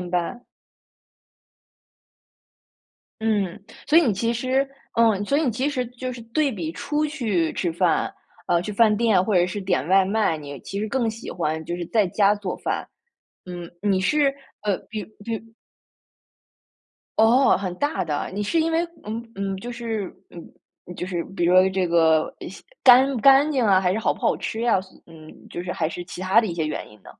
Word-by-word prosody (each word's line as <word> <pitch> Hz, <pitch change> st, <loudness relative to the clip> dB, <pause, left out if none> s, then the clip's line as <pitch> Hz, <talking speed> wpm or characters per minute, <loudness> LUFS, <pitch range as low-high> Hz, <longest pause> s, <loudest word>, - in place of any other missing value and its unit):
明 180 Hz, -1 st, -6 dB
白。 180 Hz, +7 st, -2 dB, 2.8 s
嗯， 210 Hz, -3 st, 0 dB, 0.3 s
所 310 Hz, +2 st, +6 dB
以 340 Hz, -, +5 dB
你 235 Hz, -, +2 dB
其 230 Hz, +4 st, 0 dB
实 260 Hz, +3 st, 0 dB, 0.3 s
嗯， 220 Hz, -3 st, +3 dB
所 280 Hz, -, +1 dB
以 315 Hz, -, +2 dB
你 260 Hz, -, +1 dB
其 255 Hz, +6 st, -1 dB
实 260 Hz, -4 st, -1 dB
就 250 Hz, +1 st, -6 dB
是 240 Hz, -, -9 dB
对 270 Hz, +4 st, 0 dB
比 165 Hz, -6 st, -4 dB
出 295 Hz, -, -2 dB
去 215 Hz, -, -1 dB
吃 175 Hz, -3 st, -2 dB
饭， 175 Hz, 0 st, +1 dB, 0.3 s
呃， 170 Hz, 0 st, +2 dB
去 210 Hz, +3 st, -5 dB
饭 215 Hz, 0 st, +4 dB
店 220 Hz, -5 st, +3 dB
或 210 Hz, -, 0 dB
者 175 Hz, -1 st, +5 dB
是 205 Hz, +3 st, -4 dB
点 180 Hz, -7 st, -1 dB
外 190 Hz, 0 st, +5 dB
卖， 200 Hz, -4 st, +1 dB
你 145 Hz, -2 st, -8 dB
其 200 Hz, -, -6 dB
实 215 Hz, +1 st, -2 dB
更 240 Hz, -3 st, 0 dB
喜 230 Hz, +2 st, -9 dB
欢 160 Hz, -2 st, -2 dB
就 175 Hz, -, -4 dB
是 175 Hz, -, -4 dB
在 215 Hz, -1 st, +2 dB
家 200 Hz, +2 st, +3 dB
做 200 Hz, -3 st, -4 dB
饭。 -, -, -3 dB, 0.6 s
嗯， 175 Hz, -1 st, -7 dB, 0.2 s
你 190 Hz, -1 st, +2 dB
是 280 Hz, +7 st, +2 dB, 0.3 s
呃， 205 Hz, -2 st, +1 dB
比 215 Hz, -1 st, -4 dB
如 -, -, -9 dB, 0.2 s
比 230 Hz, -, -2 dB
如 220 Hz, -, -5 dB, 1.8 s
哦， 240 Hz, +5 st, +5 dB
很 185 Hz, -2 st, -4 dB
大 290 Hz, -, -1 dB
的。 150 Hz, -3 st, -3 dB
你 205 Hz, +2 st, -2 dB
是 330 Hz, +10 st, +1 dB
因 325 Hz, +1 st, +1 dB
为 330 Hz, +1 st, +1 dB, 0.2 s
嗯 220 Hz, +2 st, -4 dB
嗯， 195 Hz, -1 st, -3 dB
就 240 Hz, +5 st, -7 dB
是， 230 Hz, -3 st, -3 dB, 0.3 s
嗯 175 Hz, +1 st, -14 dB
就 -, -, -4 dB
是 180 Hz, -2 st, -3 dB
比 175 Hz, -, +1 dB
如 175 Hz, -, +3 dB
说 185 Hz, +1 st, +6 dB
这 190 Hz, -1 st, 0 dB
个， 160 Hz, -2 st, +3 dB
呃， -, -, -6 dB
西 -, -, -12 dB, 0.2 s
干 260 Hz, +1 st, +8 dB
不 245 Hz, -, -3 dB
干 275 Hz, +3 st, +6 dB
净 260 Hz, -5 st, +1 dB
啊， 190 Hz, -2 st, +5 dB
还 180 Hz, -1 st, +1 dB
是 215 Hz, -, -1 dB
好 225 Hz, -, +1 dB
不 -, -, -16 dB
好 -, -, +2 dB
吃 220 Hz, -, -4 dB
呀， 235 Hz, -5 st, +3 dB
所 185 Hz, -, -16 dB
嗯， 160 Hz, -2 st, -14 dB, 0.2 s
就 -, -, -5 dB
是 180 Hz, 0 st, -4 dB
还 160 Hz, -2 st, -1 dB
是 175 Hz, +1 st, -7 dB
其 180 Hz, -, -9 dB
它 190 Hz, +4 st, +4 dB
的 225 Hz, -, -2 dB
一 175 Hz, -, -4 dB
些 160 Hz, -2 st, -1 dB
原 155 Hz, -, -4 dB
因 105 Hz, -, -17 dB
呢？ -, -, -13 dB
205 Hz, 220 characters per minute, -23 LUFS, 180-235 Hz, 2.8 s, 干